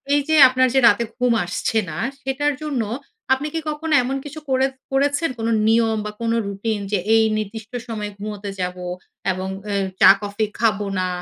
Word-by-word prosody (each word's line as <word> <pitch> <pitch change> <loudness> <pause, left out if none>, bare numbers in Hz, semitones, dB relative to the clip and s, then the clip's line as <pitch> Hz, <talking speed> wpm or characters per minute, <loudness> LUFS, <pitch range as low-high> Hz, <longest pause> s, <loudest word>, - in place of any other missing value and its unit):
এইযে 290 +2 +1
আপনার 255 0 +3
যে 270 - +5
রাতে 220 +2 +4
ঘুম 250 -1 +2
আসছে 200 +5 -2
না, 155 - -6 0.2
সেটার 290 +2 0
জন্য 280 -6 -1 0.5
আপনি 270 +3 -1
কি 325 - -1
কখনো 305 +1 -2
এমন 265 +2 -2
কিছু 295 +2 -7
করে 260 0 +3 0.3
করেছেন? 285 +4 +1
কোন 225 - -2 0.2
নিয়ম 225 -1 +3
বা, 210 - -4
কোন 230 0 0 0.2
রুটিন? 205 +2 -2
যে 205 - +2 0.2
এই 225 - +5
নির্দিষ্ট 215 +1 -6 0.2
সময়ে 210 -2 -4
ঘুমোতে 205 0 -6
যাব 180 0 -3 0.5
এবং 185 +1 -4 0.2
অ্যা 200 -1 -1 0.2
চা - - +10
কফি 205 +1 -2
খাবো 210 -3 +1
না 185 - 0
225 Hz, 175 wpm, -21 LUFS, 205-270 Hz, 0.5 s, চা